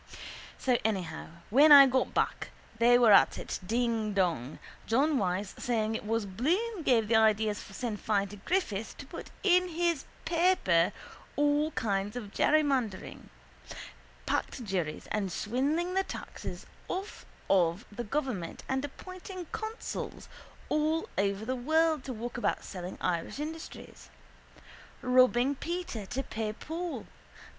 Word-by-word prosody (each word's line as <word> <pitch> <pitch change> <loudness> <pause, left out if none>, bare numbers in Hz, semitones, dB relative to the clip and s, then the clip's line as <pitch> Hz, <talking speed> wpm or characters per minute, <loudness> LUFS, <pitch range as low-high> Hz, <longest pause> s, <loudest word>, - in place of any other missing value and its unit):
So 250 -2 +1
anyhow 190 -7 -2 0.2
when 290 +6 +7
I 280 -1 +12
got 260 0 +1
back - - 0 0.3
they 240 +1 +6
were 235 -3 +6
at 200 - +6
it - - -4
dingdong, 205 - 0 0.3
John 275 +5 +3
Wyse 190 +1 -1
saying 225 -2 0
it 220 - -4
was 225 -1 0
Bloom 345 - -1
gave 235 -7 +3
the 225 0 +4
ideas 215 -1 +3
for 195 - -12
Sinn 230 -1 -3
Fein 200 -1 0
to 205 - -9
Griffith 225 - -2
to - - -8
put - - -9
in 365 -1 +4
his 340 -3 0 0.2
paper 330 - +3 0.4
all 290 +1 +2
kinds 200 -1 -1
of 215 -5 -6
jerrymandering, 275 -10 +1 1.0
packed 255 - -2
juries 180 -7 -3
and 200 -3 -1
swindling 285 - -1
the 385 - +3
taxes - - -7 0.2
off 390 +3 -5 0.2
of 180 +2 +2
the 240 +4 -5
government 235 - -3
and 265 +1 -1
appointing 370 +5 -8
consuls 445 0 -5 0.4
all 310 +2 +1
over 200 +2 0
the 255 +3 -1
world 315 +3 +2
to 265 - -4
walk 240 +1 -5
about - - 0
selling 180 -1 -7
Irish 170 +6 -1
industries. 320 +2 -8 0.9
Robbing 255 +1 +4
Peter 335 - -4
to 260 +5 -3
pay 215 -3 -3
Paul. 330 +8 -5
245 Hz, 135 wpm, -30 LUFS, 205-310 Hz, 1.0 s, I